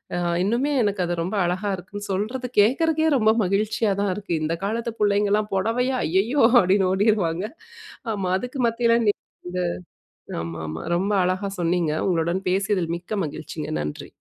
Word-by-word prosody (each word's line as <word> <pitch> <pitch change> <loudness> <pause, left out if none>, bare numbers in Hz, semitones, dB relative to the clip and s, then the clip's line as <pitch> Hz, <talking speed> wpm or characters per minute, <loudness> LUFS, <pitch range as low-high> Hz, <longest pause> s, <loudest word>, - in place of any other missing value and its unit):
அ - - -1 0.3
இன்னுமே 240 +8 +1
எனக்கு 200 -3 0
அது 175 - -1
ரொம்ப 190 +5 -3
அழகா 185 +4 -1
இருக்குன்னு, 205 +3 -8
சொல்றத 240 +6 -2
கேட்கிறக்கே 315 +8 +3
ரொம்ப 220 -1 +4
மகிழ்ச்சியா 210 +2 +1
தான் 200 -2 +1
இருக்கு! 205 -4 -4
இந்த 165 +2 0
காலத்து 230 +2 -2
புள்ளைங்கலாம் 205 0 +2
"பொடவையா? 250 +6 +1
ஐயயோ!" 225 - +2 0.2
அப்படீன்னு 190 0 +3
ஓடிருவாங்க. 195 -3 +1 0.7
ஆமா. 190 -3 -2
அதுக்கு 250 +1 -4
மத்தியில 230 0 +2
நீங்க 205 - +4 1.3
ஆமாமா. 80 -1 -5
ரொம்ப 195 +4 0
அழகா 185 +2 -1
சொன்னீங்க. 170 -2 +1 0.2
உங்களுடன் 170 +2 0
பேசியதில் 190 -3 0
மிக்க 175 +4 -18
மகிழ்ச்சிங்க! 155 +1 -6
நன்றி! 75 0 -5
200 Hz, 140 wpm, -23 LUFS, 180-220 Hz, 1.3 s, ரொம்ப